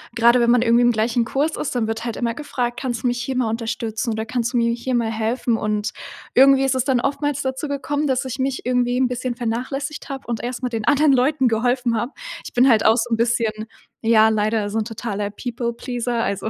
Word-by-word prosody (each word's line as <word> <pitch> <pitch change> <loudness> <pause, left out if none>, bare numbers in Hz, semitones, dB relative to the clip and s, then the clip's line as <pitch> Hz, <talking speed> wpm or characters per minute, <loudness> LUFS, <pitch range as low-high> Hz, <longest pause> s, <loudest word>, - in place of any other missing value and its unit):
Gerade 235 +1 +5
wenn 235 0 +3
man 245 - +4
irgendwie 235 0 +4
im 240 - +5
gleichen 230 +2 +1
Kurs 285 +6 -1
ist, 280 - -3
dann 225 -3 0
wird 225 +1 -3
halt 230 - -3
immer 235 -1 -1
gefragt: 245 -3 -3
„Kannst 240 -2 -3
du - - +2
mich 245 0 -1
hier 260 +2 -3
mal 245 -3 +1
unterstützen, 225 0 -3
oder 220 0 -3
kannst 240 +1 -2
du - - +1
mir 235 0 +2
hier 240 +2 -2
mal 230 -2 0
helfen?“ 225 +1 0
Und 210 -1 -1 0.4
irgendwie 270 +1 +6
ist 270 -1 +1
es 260 - +1
dann 260 -3 +2
oftmals 285 0 -1
dazu 265 +3 -3
gekommen, 285 +1 -2
dass 265 0 0
ich 260 0 -5
mich 265 0 -2
irgendwie 245 0 +1
'n 260 - +3
bisschen 250 0 -3
vernachlässigt 255 +6 -4
habe 270 -2 -6
und 235 -2 -3
erst 245 +1 -4
mal 250 - -1
den 225 -2 -3
anderen 290 -1 +4
Leuten 265 +1 +2
geholfen 240 +1 +1
habe. 235 +5 -2 0.3
Ich - - -9
bin 255 +2 +5
halt 220 -3 +4
auch 220 +2 +5
so 240 +1 -1
'n 225 - +1
bisschen 230 -2 0 0.4
ja, 220 -1 +6
leider 215 -1 0
so 220 - -3
'n - - 0
totaler 210 -3 -4
People 240 +2 -4
Pleaser. 240 -1 -2
Also, 200 +2 -2
240 Hz, 235 wpm, -21 LUFS, 225-260 Hz, 0.4 s, irgendwie